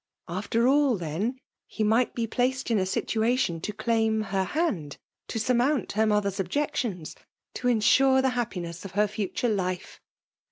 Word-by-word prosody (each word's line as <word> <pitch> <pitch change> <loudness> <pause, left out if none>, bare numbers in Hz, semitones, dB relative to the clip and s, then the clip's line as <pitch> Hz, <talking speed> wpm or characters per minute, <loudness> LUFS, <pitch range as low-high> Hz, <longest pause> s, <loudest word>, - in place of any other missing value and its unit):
After 205 +6 -1
aUi 275 -2 +4
then, 185 - -3 0.3
he 220 - -3
might 225 +4 +2
be 235 - 0
placed 255 +2 -1
in 220 - +3
a 185 - 0
situation 220 -4 0
to 210 - -3
claim 220 0 +1
her 190 -1 +1
hand 195 - -2 0.2
— - - -62
to - - -4
surmount 250 +3 +1
her 220 +1 +2
mother's 205 -2 +1
eb}ectiens 195 - -2 0.2
— - - -64
to 250 - -3
insure 260 +3 +4
the 265 0 +3
happiness 180 -9 -4
of 195 - -8
her 210 +2 +3
iiitiire 210 +2 -1
life 185 -1 -4
220 Hz, 165 wpm, -27 LUFS, 190-250 Hz, 0.3 s, aUi